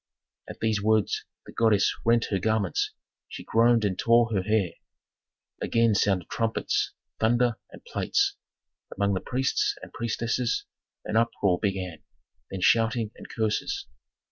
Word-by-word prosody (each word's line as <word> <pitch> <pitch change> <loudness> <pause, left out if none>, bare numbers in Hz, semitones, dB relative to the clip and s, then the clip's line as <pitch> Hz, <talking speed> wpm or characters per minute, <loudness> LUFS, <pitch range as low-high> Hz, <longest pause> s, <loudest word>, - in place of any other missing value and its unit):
At - - -9
these 110 -2 +1
words 110 0 +1 0.2
the - - -11
goddess 110 -3 +3
rent 115 0 +3
her 95 - +1
garments, 110 -1 0 0.4
she - - -8
groaned 115 0 +3
and 95 -3 -1
tore 115 -1 +4
her 95 - +2
hair. 100 -3 +1 0.9
Again 115 -1 +2
sounded 95 -4 +1
trumpets, 115 -1 -1 0.3
thunder, 120 +1 +2
and - - -14
plates; - - 0 0.6
among 100 0 +1
the 95 - 0
priests 130 +1 0
and - - -11
priestesses 115 +1 -1 0.4
an 105 - 0
uproar 105 -6 +2
began, 95 -5 -2 0.5
then 95 - -5
shouting 115 +1 +2
and - - -12
curses. 110 -2 -1
110 Hz, 135 wpm, -27 LUFS, 100-115 Hz, 0.9 s, tore